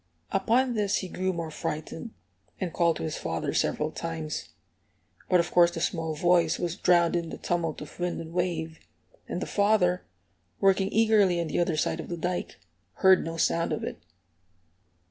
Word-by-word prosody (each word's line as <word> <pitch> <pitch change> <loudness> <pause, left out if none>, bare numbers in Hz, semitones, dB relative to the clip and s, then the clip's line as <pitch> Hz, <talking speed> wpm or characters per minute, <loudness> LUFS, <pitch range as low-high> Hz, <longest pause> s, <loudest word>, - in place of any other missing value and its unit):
Upon 240 +6 +2
this 205 -3 +1
he 190 - -3
grew 185 +1 -1
more 165 -3 -4
frightened, 155 +7 -5 0.5
and 180 -4 -3
called 170 -2 +2
to - - -5
his 160 -2 -3
father 80 -1 -3
several 155 +1 0
times. 160 -2 -5 0.8
But 180 - +5
of 170 0 0
course 175 -1 +6
the 170 -1 -6
small 165 -2 -1
voice 170 0 +3
was 175 -1 -2
drowned 175 -2 +3
in 170 -1 -1
the - - -6
tumult 170 -3 -2
of 150 - -10
wind 175 0 -1
and 165 0 -8
wave, 165 -3 -2 0.5
and - - -3
the - - -3
father, 200 -3 +2 0.6
working 195 0 +3
eagerly 210 -5 +4
on 170 - 0
the - - -1
other 170 -2 +1
side 160 - 0
of - - -6
the 175 - -3
dike, 175 +2 -3 0.3
heard 190 -1 +5
no 165 0 -5
sound 165 0 +1
of - - -2
it. - - -5
175 Hz, 180 wpm, -27 LUFS, 165-185 Hz, 0.8 s, course